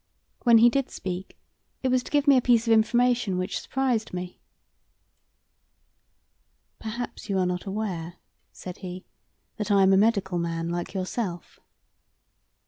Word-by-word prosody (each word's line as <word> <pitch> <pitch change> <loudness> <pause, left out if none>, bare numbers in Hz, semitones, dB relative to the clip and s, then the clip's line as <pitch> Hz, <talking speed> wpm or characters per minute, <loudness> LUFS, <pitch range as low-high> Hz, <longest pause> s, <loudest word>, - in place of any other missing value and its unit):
When 235 -1 +7
he 230 +2 +7
did 275 +1 0
speak 185 0 -6 0.5
it 260 - +1
was 255 0 +2
to - - -10
give 290 0 +1
me 280 - +7
a 255 - +4
piece 235 -1 +3
of 230 - +4
information 235 -2 +2
which 185 +2 -2
surprised 255 -6 -1
me. 180 0 -6 2.4
"Perhaps 230 +1 -6
you 195 - 0
are 185 - +2
not 180 0 -2
aware," 185 -5 -4 0.4
said 180 -1 -9
he, 185 0 -8 0.5
"that 210 -2 -3
I 200 -1 +5
am 190 0 +5
a - - +5
medical 200 -4 +2
man 165 0 -2
like 175 +3 -4
yourself?" 185 -1 -4
200 Hz, 145 wpm, -26 LUFS, 180-240 Hz, 2.4 s, When